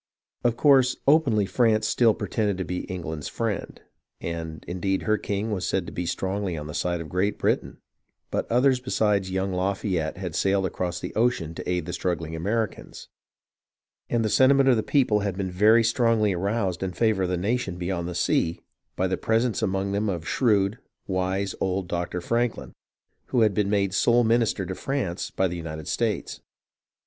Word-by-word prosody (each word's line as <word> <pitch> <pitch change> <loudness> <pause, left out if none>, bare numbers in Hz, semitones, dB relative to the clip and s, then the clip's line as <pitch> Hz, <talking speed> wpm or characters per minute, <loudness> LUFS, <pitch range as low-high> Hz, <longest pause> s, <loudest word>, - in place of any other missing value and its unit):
Of 120 -1 +1
course 135 -3 +5
openly 140 -9 +4
France 110 0 +2
still 115 -1 +3
pretended 105 -1 -1
to 95 - -2
be 90 - -4
England's 80 -5 -5
friend, 115 -3 -3 0.4
and 80 -1 -5
indeed 95 +2 -1
her 110 - +2
king 105 +1 -2
was 95 -3 -2
said 95 -2 0
to - - -7
be 90 0 -4
strongly 95 0 -2
on 75 - -6
the 75 - -7
side 85 +1 -1
of 80 - -7
Great 95 +5 0
Britain, - - -1 0.5
but - - -2
others 125 +2 +4
besides 105 -6 +1
young 95 +1 -1
Lafayette 90 -3 -1
had 90 -4 -5
sailed 95 +2 +1
across 90 -2 -3
the - - -6
ocean 110 -8 0
to - - -6
aid 90 -3 0
the 90 - -5
struggling 80 -3 -2
Americans, 105 +5 -3 1.0
and 115 -2 +1
the - - +1
sentiment 135 +3 +5
of 125 - +5
the 110 - +1
people 120 -5 +2
had 100 -2 -2
been 95 -2 -2
very 110 +5 +5
strongly 115 -3 +2
aroused 95 0 -1
in 95 -1 -2
favour 110 0 +1
of 90 - 0
the 90 - 0
nation 100 -1 -1
beyond 90 -1 -2
the 90 - -5
sea 85 -1 +1 0.4
by 95 - 0
the 95 0 0
presence 115 +1 +1
among 95 -2 -1
them 100 +1 0
of 85 -3 -4
shrewd, 105 -3 +2 0.3
wise 95 +1 -1
old 95 -1 -1
Doctor 85 +1 -3
Franklin, 115 +4 -1 0.5
who 125 - +1
had 105 -2 +4
been 100 +1 +1
made 100 -2 +1
sole 120 +4 +4
minister 115 -4 +2
to 95 - -4
France 100 -6 -3
by 95 - 0
the 90 0 -5
United 80 -2 -6
States. 115 -3 -2
100 Hz, 180 wpm, -25 LUFS, 90-115 Hz, 1.0 s, course